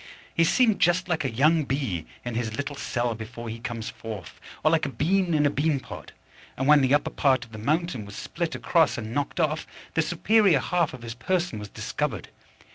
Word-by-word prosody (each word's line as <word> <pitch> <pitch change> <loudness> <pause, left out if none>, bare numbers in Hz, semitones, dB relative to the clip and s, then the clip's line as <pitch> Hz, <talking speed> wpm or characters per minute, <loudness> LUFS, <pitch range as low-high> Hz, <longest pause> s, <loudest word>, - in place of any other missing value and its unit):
He 165 - +3
seemed 225 +3 +3
just 175 +1 +3
like 175 -4 0
a 135 - 0
young 155 +7 +3
bee 130 - -2 0.2
in 120 - -3
his 115 -1 -2
little 145 0 -3
cell 120 -4 -1
before 115 +1 -7
he 115 +1 -6
comes 115 -2 -5
forth, 105 -7 -8 0.2
or 155 - +4
like 160 -3 +2
a - - -3
bean 175 +4 +1
in 150 -1 +3
a 145 - +3
bean 145 0 +1
pod; - - -10 0.5
and 130 - -1
when 150 -1 +7
the 135 +1 +4
upper 145 - 0
part 130 -3 +2
of 115 - -21
the 110 - -8
mountain 150 -1 -1
was 100 +1 -10
split 170 -1 -3
across 165 -4 +2
and 110 -1 -5
knocked 145 +6 -2
off, 155 -1 0 0.3
the 165 - +3
superior 180 0 +3
half 170 0 0
of 120 - -13
his 115 -1 -5
person 175 - -1
was 105 -1 -7
discovered. - - -3
140 Hz, 210 wpm, -26 LUFS, 115-165 Hz, 0.5 s, when